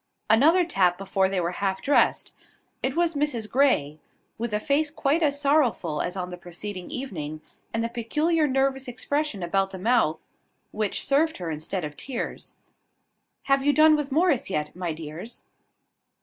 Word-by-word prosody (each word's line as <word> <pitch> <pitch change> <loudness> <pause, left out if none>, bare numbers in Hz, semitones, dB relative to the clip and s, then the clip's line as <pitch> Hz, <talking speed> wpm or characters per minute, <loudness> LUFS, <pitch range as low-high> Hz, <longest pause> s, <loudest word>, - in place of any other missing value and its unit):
Another 320 +11 +5
tap 180 - +2
before 190 0 0
they 190 -1 0
were 170 0 -1
half 190 +1 -2
dressed. 285 - +2 0.5
It 265 +1 -1
was 340 0 +2
Mrs 285 -7 -1
Grey, 215 - +2 0.4
with 235 0 -2
a 210 - 0
face 290 +6 +1
quite 295 +2 0
as 285 -2 +2
sorrowful 275 - +2
as 180 +2 -3
on 180 -1 -3
the 180 0 -8
preceding 180 +2 -7
evening, 155 - -4 0.3
and 225 - -1
the - - 0
peculiar 300 +8 0
nervous 270 0 0
expression 255 -3 -2
about 195 +3 +1
the 190 - -7
mouth 195 -6 +1 0.5
which 210 -2 -1
served 310 +3 +2
her 175 -3 -4
instead 155 +3 -3
of 150 0 -7
tears. 260 - -5 0.9
"Have 275 0 +2
you 290 +1 +3
done 310 +1 +6
with 295 -2 -3
Morris 300 - +2
yet, 150 -4 -2
my 180 -2 -3
dears?" 160 +8 -7
230 Hz, 165 wpm, -25 LUFS, 180-285 Hz, 0.9 s, done